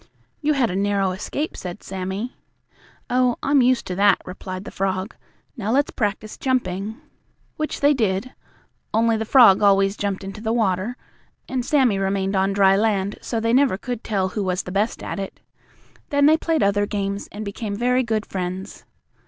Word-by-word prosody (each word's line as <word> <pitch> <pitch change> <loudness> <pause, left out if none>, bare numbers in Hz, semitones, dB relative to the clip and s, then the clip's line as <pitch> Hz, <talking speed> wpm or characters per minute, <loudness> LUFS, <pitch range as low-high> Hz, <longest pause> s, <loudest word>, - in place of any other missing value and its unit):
"You 300 +1 +2
had 255 -7 +1
a - - -3
narrow 200 -1 +1
escape," 245 - -4
said 180 +2 -7
Sammie. 190 +5 -4 0.7
"Oh, 250 -1 +2
I'm 280 -1 +4
used 255 0 +2
to 180 - -4
that," 200 0 +5
replied 185 +1 -7
the - - -7
frog. 190 +2 -2 0.4
"Now, 215 -5 -4
let's 280 +4 +2
practice 210 0 -3
jumping." 220 -4 -1 0.6
Which 310 0 -3
they 285 +1 +5
did, 220 -1 -1 0.6
only 225 0 +3
the 220 0 -2
frog 225 -5 +7
always 195 -1 +4
jumped 200 -2 -3
into 195 +2 -7
the 220 0 -1
water 215 +1 0 0.5
and 255 -2 -2
Sammie 255 -7 +2
remained 195 0 0
on 190 +1 +2
dry 195 -1 +4
land, 200 -1 0
so 230 - -2
they 230 +1 +1
never 260 -6 +4
could 245 +1 -5
tell 195 -3 0
who 205 +2 -3
was 185 0 -1
the 180 - -7
best 205 +4 -1
at - - -4
it. 195 - -6 0.7
Then 285 0 +3
they 310 +2 +7
played 320 -1 0
other 205 +1 +2
games, 200 -1 -3
and 210 +1 -6
became 200 +1 -4
very 250 +3 +2
good 225 -3 -1
friends. 185 +1 -5
205 Hz, 175 wpm, -22 LUFS, 195-245 Hz, 0.7 s, frog